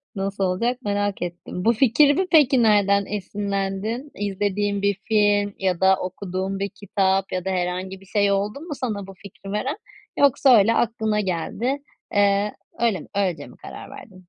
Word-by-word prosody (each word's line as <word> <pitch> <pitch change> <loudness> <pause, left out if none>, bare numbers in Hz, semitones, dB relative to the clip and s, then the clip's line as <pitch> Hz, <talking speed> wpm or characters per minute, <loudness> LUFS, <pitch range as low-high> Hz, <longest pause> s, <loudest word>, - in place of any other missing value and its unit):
Nasıl 195 0 -2
olacak 235 +8 0
merak 205 -2 -1
ettim. 175 +1 -5
Bu 230 - +5
fikirde 285 - +4
peki, 270 -6 +5
nereden 200 -2 +4
esinlendin? 200 +5 -3
İzlediğin 205 0 -1
bir 200 -1 +1
film 205 -2 +2
ya 185 -2 0
da 190 0 +6
okuduğun 190 +1 -4
bir 200 - -2
kitap 195 -1 0
ya 185 0 -3
da - - -1
herhangi 185 +1 -3
bir - - -16
şey 200 0 +1
oldu 205 +6 -1
mu 325 -3 -6
sana 210 -7 -4
bu 195 - -10
fikri 195 +1 -11
veren, 265 - -2 0.4
yoksa 270 -2 +5
öyle 220 +3 +4
aklına 220 -2 0
geldi, 205 - -2 0.4
eee, 205 0 +2 0.3
öyle 230 -5 +1
mi - - -12
öylece 180 -7 -1
mi - - -16
karar - - -10
verdin? 195 - -12
200 Hz, 165 wpm, -23 LUFS, 190-220 Hz, 0.4 s, da